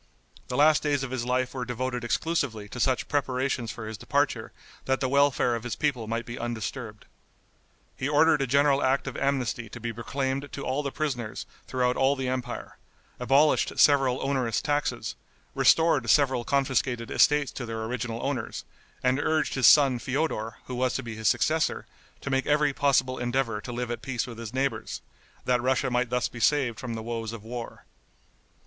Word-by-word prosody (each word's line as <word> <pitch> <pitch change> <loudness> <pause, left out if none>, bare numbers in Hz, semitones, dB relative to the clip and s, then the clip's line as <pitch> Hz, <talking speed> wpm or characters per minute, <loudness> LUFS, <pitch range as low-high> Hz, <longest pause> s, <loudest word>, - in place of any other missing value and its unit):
The 125 - -3
last 150 +1 +5
days 145 -2 0
of 130 - -5
his 125 -2 -2
life 125 0 0
were 130 -2 -3
devoted 125 0 -3
exclusively 120 -4 -1
to 125 - -7
such 130 0 +1
preparations 130 -4 -1
for 110 +1 -6
his 110 -2 -7
departure 140 +2 0 0.3
that 135 0 +1
the 135 - 0
welfare 140 -2 +3
of 115 - -2
his 120 -1 -4
people 135 -7 -1
might 115 +1 -2
be 120 0 -7
undisturbed. 120 -1 -5 0.9
He 130 - -2
ordered 150 0 +4
a 135 - 0
general 140 +2 +3
act 130 +1 +1
of 135 - -5
amnesty 125 -5 -1
to 120 - -9
be 115 0 -4
proclaimed 135 +4 -3
to 140 - -5
all 130 +3 0
the 140 -2 -3
prisoners 125 -8 -3 0.2
throughout 125 -1 0
all 135 +1 +3
the 130 -1 -3
empire, 130 -1 -4 0.4
abolished 135 +5 +3
several 135 -3 +4
onerous 130 -5 0
taxes, 145 -1 -1 0.4
restored 155 -8 +4
several 130 -2 +3
confiscated 130 -2 0
estates 145 -2 +3
to 120 - -6
their 110 -1 -4
original 115 0 -4
owners, 135 -5 -3 0.4
and 130 +1 +2
urged 155 +1 +1
his 130 -5 +4
son, 135 -3 +6
Feodor, 130 -5 -2
who 130 - -7
was 125 0 0
to 135 - -2
be 115 -1 -6
his 110 -1 -2
successor, 155 +9 +1 0.4
to 140 - -4
make 135 0 0
every 150 -1 +3
possible 135 -2 +2
endeavor 120 -3 -1
to 120 - -7
live 120 0 -3
at 120 - -4
peace 125 -2 -2
with 120 -2 -9
his 115 -2 -6
neighbors, 135 +1 -2 0.4
that 125 -1 +2
Russia 130 0 +1
might 125 0 +1
thus 125 0 0
be 120 - -10
saved 130 -1 +2
from 120 -3 -5
the 110 - -5
woes 115 -1 -4
of 115 -3 -8
war. 120 +1 -7
130 Hz, 185 wpm, -27 LUFS, 120-140 Hz, 0.9 s, son